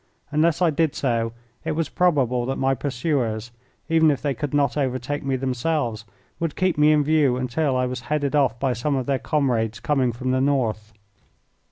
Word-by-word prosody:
Unless 160 +3 +2
I 170 - +4
did 155 0 0
so 115 -4 0 0.3
it - - -2
was 160 0 -1
probable 130 -9 +1
that 135 - -1
my 135 0 +1
pursuers, 120 -5 -2 0.4
even 160 -1 +4
if 140 - +1
they 145 -2 -1
could 145 0 -4
not 140 -2 +1
overtake 135 0 -2
me 135 -1 0
themselves, 125 -3 -1 0.3
would 165 -2 -2
keep 185 -2 +1
me 150 +1 +5
in 150 -1 +4
view 145 -4 +2
until 130 +2 0
I 125 - +1
was 125 0 -3
headed 150 -1 0
off 130 -5 +2
by 135 -2 +1
some 130 +5 -1
of 130 -2 -1
their 135 0 0
comrades 120 -7 0
coming 135 -4 +1
from 125 +2 -3
the 130 0 +1
north. 115 -6 0
135 Hz, 190 wpm, -23 LUFS, 125-150 Hz, 0.4 s, me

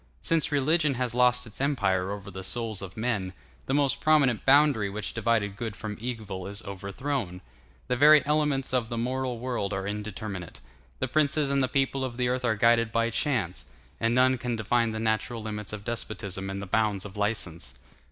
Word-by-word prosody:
Since 165 -2 +1
religion 150 +1 +2
has 125 -1 -1
lost 125 0 +3
its 110 +3 -7
empire 100 -10 +1
over 100 0 -6
the 95 +1 -7
souls 110 +1 +1
of 95 0 -8
men, 110 -5 -1 0.3
the 135 - 0
most 140 -2 +2
prominent 140 -7 +3
boundary 135 -7 +5
which 105 +1 -4
divided 110 -3 0
good 110 -1 -5
from 105 0 -5
evil 110 -6 -5
is 100 +2 -6
overthrown; 100 +1 -4 0.5
the - - +1
very 150 +3 +7
elements 150 -3 +1
of 120 -3 +1
the 120 - -3
moral 125 +1 -1
world 115 -5 -2
are 95 0 -3
indeterminate; 105 -3 -5 0.4
the 130 - -1
princes 150 +1 +2
and 140 0 +2
the 130 - +2
peoples 135 0 0
of 120 -2 -6
the 125 -1 +1
earth 125 0 -1
are 115 -2 +2
guided 115 +1 +3
by 115 0 +1
chance, 115 - -1 0.3
and 115 +1 +1
none 130 0 +4
can 120 -1 -2
define 115 +1 +1
the 110 0 -4
natural 110 +1 -1
limits 105 -2 -5
of 105 -1 -6
despotism 100 -5 -4
and 100 +1 -4
the - - -5
bounds 105 0 0
of 95 - -9
license. 95 - -2
115 Hz, 190 wpm, -27 LUFS, 100-130 Hz, 0.5 s, very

